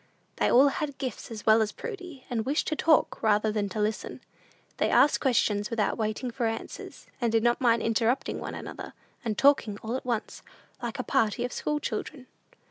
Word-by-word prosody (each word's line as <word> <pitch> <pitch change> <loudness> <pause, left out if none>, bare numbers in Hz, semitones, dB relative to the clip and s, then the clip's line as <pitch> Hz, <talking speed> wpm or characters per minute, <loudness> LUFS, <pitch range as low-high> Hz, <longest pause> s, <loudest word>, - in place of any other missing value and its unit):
They - - +2
all 270 +3 +7
had 285 0 -4
gifts 255 -5 -5
as 220 -3 -8
well 220 0 +6
as 215 -1 0
Prudy, 360 - -8
and 230 -2 -1
wished 280 +6 0
to 310 - -1
talk 315 0 +2
rather 215 0 +3
than 210 -2 -1
to 205 - -5
listen. 210 +1 -2 0.6
They - - +1
asked 295 - +5
questions 210 -6 +1
without 230 -3 0
waiting 220 +3 -2
for 235 -1 -1
answers, 225 0 -6 0.2
and 235 -2 +1
did 225 0 +2
not 240 +1 +2
mind 235 -2 +3
interrupting 230 +3 0
one - - -5
another, - - -8 0.3
and 220 -3 -2
talking 275 -7 +3
all 225 +3 -2
at 260 - -4
once, 235 -3 -3 0.4
like 240 +1 -4
a 255 - -2
party 240 -3 +1
of 250 - -5
school 300 0 -1
children. 255 +1 -5
235 Hz, 195 wpm, -28 LUFS, 220-265 Hz, 0.6 s, all